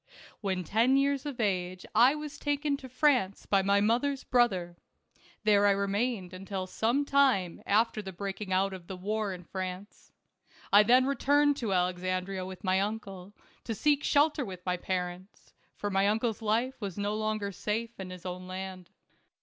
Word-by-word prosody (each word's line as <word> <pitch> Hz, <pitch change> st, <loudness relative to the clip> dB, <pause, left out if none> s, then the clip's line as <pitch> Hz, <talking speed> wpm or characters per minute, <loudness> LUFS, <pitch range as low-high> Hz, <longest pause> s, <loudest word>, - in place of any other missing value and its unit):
When 190 Hz, -3 st, -2 dB
ten 230 Hz, +9 st, +3 dB
years 280 Hz, +1 st, +1 dB
of 275 Hz, -4 st, -6 dB
age, 185 Hz, -4 st, -1 dB
I 255 Hz, +5 st, +6 dB
was 300 Hz, -1 st, -7 dB
taken 290 Hz, 0 st, 0 dB
to 260 Hz, -2 st, -11 dB
France 255 Hz, -8 st, +1 dB
by 195 Hz, -1 st, +3 dB
my 200 Hz, +1 st, +3 dB
mother's 250 Hz, +6 st, +1 dB
brother. 190 Hz, -9 st, +1 dB, 0.7 s
There 205 Hz, -1 st, +4 dB
I -, -, +5 dB
remained 200 Hz, -1 st, -1 dB
until 190 Hz, 0 st, -5 dB
some 235 Hz, +9 st, 0 dB
time 260 Hz, -12 st, +2 dB
after 215 Hz, +1 st, +2 dB
the 190 Hz, -2 st, -7 dB
breaking 195 Hz, +1 st, -5 dB
out 190 Hz, +1 st, +2 dB
of 180 Hz, -2 st, -9 dB
the 190 Hz, -, -6 dB
wars 205 Hz, +1 st, -2 dB
in 180 Hz, -, -11 dB
France. 185 Hz, +2 st, -7 dB, 0.6 s
I 205 Hz, -, +9 dB
then 250 Hz, +4 st, +5 dB
returned 285 Hz, +1 st, +3 dB
to 225 Hz, -7 st, -2 dB
Alexandria 185 Hz, +1 st, -1 dB
with 190 Hz, +2 st, -9 dB
my 185 Hz, -1 st, +2 dB
uncle, 200 Hz, -2 st, -5 dB, 0.3 s
to 225 Hz, -, -4 dB
seek 290 Hz, +6 st, +2 dB
shelter 290 Hz, 0 st, +3 dB
with 185 Hz, -5 st, -8 dB
my 180 Hz, -1 st, +1 dB
parents; 180 Hz, +1 st, -5 dB, 0.2 s
for 205 Hz, -, -3 dB
my 195 Hz, +1 st, +3 dB
uncle's 220 Hz, +1 st, 0 dB
life 235 Hz, +4 st, 0 dB
was 195 Hz, -3 st, -5 dB
no 205 Hz, +1 st, -1 dB
longer 215 Hz, -1 st, -2 dB
safe 225 Hz, +4 st, -3 dB
in 190 Hz, -1 st, -6 dB
his 185 Hz, -1 st, -10 dB
own 180 Hz, 0 st, -6 dB
land. 185 Hz, -1 st, -7 dB
205 Hz, 170 wpm, -29 LUFS, 185-240 Hz, 0.7 s, I